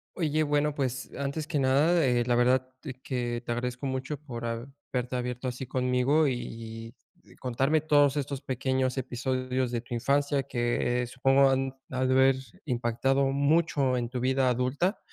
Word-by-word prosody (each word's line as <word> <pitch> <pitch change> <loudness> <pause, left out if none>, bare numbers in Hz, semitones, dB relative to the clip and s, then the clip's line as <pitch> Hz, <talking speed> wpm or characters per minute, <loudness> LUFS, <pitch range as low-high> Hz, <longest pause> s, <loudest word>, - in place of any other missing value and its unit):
Oye, 155 -3 0
bueno, 145 0 +1
pues, 130 -2 -3
antes 140 +2 -3
que 150 -2 -1
nada, 145 +6 +3
eh, 125 -2 +2
la 120 - +1
verdad 125 +1 +3 0.4
que 120 -2 -2
te - - -3
agradezco 125 +2 -3
mucho 135 +2 -3
por 125 -5 -7
haberte 125 +1 -4
abierto 125 +1 -3
así 125 +1 -4
conmigo 130 +4 +2
y 115 -2 -5 0.3
y - - -17
contarme 135 +5 0
todos 145 -2 +4
estos 140 -1 -3
pequeños 130 0 -1
episodios 130 0 -1
de 120 -1 -2
tu 120 - -9
infancia 140 +3 +1
que, 120 -1 0
eh, - - -4
supongo 135 +2 +4
han 135 0 +1 0.2
de 130 - -5
haber 130 +1 +4 0.3
impactado 130 +1 +1
mucho 140 -2 +2
en 120 -1 -1
tu 125 0 -4
vida 130 0 +2
adulta. 130 - 0
130 Hz, 160 wpm, -28 LUFS, 125-140 Hz, 0.4 s, todos